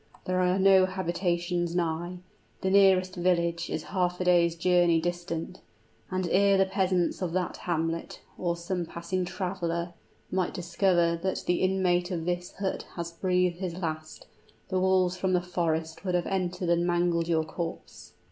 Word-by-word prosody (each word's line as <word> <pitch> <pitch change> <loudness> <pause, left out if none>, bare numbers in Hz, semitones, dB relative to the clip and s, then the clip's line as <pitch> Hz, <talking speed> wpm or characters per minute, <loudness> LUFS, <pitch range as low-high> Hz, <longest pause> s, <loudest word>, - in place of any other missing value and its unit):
There 185 0 0
are 180 +1 +2
no 190 -1 +6
habitations 175 -1 -1
nigh; 175 +1 -1 0.4
the 190 - 0
nearest 190 -2 +4
village 170 -1 +1
is - - -3
half 180 -2 0
a - - 0
day's 170 -2 +4
journey 175 -1 +3
distant; 175 +1 -4 0.5
and 185 -1 -1
ere 200 +1 +4
the 195 - +4
peasants 190 -2 0
of 175 -3 -2
that 185 -1 -1
hamlet, 165 -1 -2 0.2
or 170 -1 -2
some 170 0 -3
passing 175 +2 -3
traveler, 175 -2 -3 0.4
might 185 -1 -1
discover 175 -1 +2
that 190 +1 -2
the 175 - +1
inmate 185 -2 +2
of 170 -3 -3
this 175 0 -2
hut 195 0 -3
had 170 -1 -3
breathed 180 -2 +1
his 180 -3 -3
last, 155 -3 -5 0.4
the 185 -1 +1
wolves 185 -1 +2
from 185 0 0
the 180 - +4
forest 165 -2 -2
would 180 -2 0
have 175 - +1
entered 180 -2 -2
and 170 0 +2
mangled 175 -1 +1
your 160 -2 +2
corpse." 165 +1 -7
180 Hz, 160 wpm, -28 LUFS, 170-185 Hz, 0.5 s, no